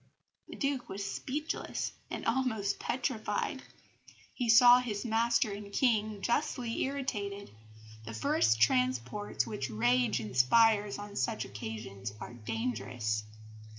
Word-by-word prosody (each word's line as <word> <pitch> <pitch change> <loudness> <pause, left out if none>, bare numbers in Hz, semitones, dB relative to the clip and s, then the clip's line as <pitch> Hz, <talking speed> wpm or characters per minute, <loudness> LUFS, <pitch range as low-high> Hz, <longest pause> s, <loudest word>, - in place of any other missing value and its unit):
The - - -9
Duke 275 -3 -2
was 200 +1 -4
speechless 295 +9 -3 0.2
and - - -5
almost 230 -5 0
petrified; 250 -3 -2 0.7
he 245 -3 -2
saw 245 +2 +9
his 225 -3 -3
master 230 0 +2
and 200 0 -7
King 215 -4 +1
justly 245 -2 -1
irritated. 205 -8 -3 0.5
The 115 0 -6
first 110 0 +2
transports 125 - +1
which 125 +3 -4
rage 120 +1 +2
inspires 205 - +3
on 205 0 -8
such 225 +1 -1
occasions 105 -1 -6
are - - -8
dangerous. 110 -1 -3
200 Hz, 115 wpm, -31 LUFS, -, 0.7 s, saw